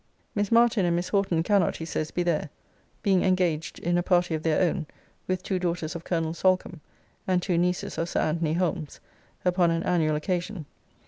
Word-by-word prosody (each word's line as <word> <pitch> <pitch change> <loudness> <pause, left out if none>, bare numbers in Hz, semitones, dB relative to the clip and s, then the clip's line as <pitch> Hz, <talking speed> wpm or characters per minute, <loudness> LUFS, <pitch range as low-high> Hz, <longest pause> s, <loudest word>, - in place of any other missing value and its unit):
Miss 205 0 -1
Martin 235 -3 +4
and 170 -1 +2
Miss 175 +1 -2
Horton 190 -5 +1
cannot, 200 -1 +2
he 165 - -5
says, 155 -1 -3
be 175 - -1
there, 160 -3 0 0.5
being 195 -4 +3
engaged 175 -4 0
in 175 +1 0
a - - +2
party 175 -1 +2
of 155 - -1
their 160 +2 +2
own, 170 -3 -3 0.4
with 185 0 -1
two 185 -1 -1
daughters 170 -2 -2
of 170 - -6
Colonel 165 -2 -1
Solcombe, 185 -1 +1 0.5
and 185 -1 +3
two 180 0 -1
nieces 180 +1 0
of 165 +1 -1
Sir - - 0
Anthony 160 0 0
Holmes, 170 -3 -2 0.5
upon 180 -1 +3
an 165 0 0
annual 160 -4 +1
occasion. 175 +2 -3
175 Hz, 190 wpm, -26 LUFS, 165-185 Hz, 0.5 s, Martin